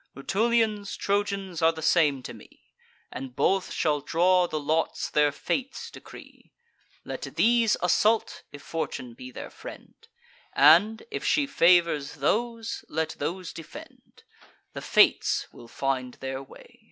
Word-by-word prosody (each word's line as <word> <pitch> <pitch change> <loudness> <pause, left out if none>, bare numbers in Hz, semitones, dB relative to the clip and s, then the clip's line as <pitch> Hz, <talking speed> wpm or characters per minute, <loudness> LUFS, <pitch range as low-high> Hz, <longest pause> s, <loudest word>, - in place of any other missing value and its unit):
Rutulians, 215 +5 0
Trojans, 200 -3 -2
are 165 0 +5
the 160 -1 -8
same 150 -6 +3
to - - -7
me; - - -17 0.5
And 130 -1 -7
both 195 -1 +1
shall 150 -2 0
draw 180 +4 +3
the 155 - -3
lots 155 +2 -1
their 150 -1 +3
fates 265 - -4
decree. - - -14 0.5
Let - - -6
these 230 -1 +3
assault, 215 +5 +2
if 145 - -11
Fortune 130 -6 -5
be 130 +2 -10
their 125 - -9
friend; - - -11 0.6
And, 175 +10 +5
if - - -4
she 295 -2 +2
favours 170 - +3
those, 230 - -2
let 160 0 -1
those 175 +4 -4
defend: 165 -2 -13 0.5
The - - -6
Fates - - +3
will 120 - -13
find 130 -1 -3
their 135 0 -5
way." 135 - -16
165 Hz, 135 wpm, -26 LUFS, 145-205 Hz, 0.6 s, are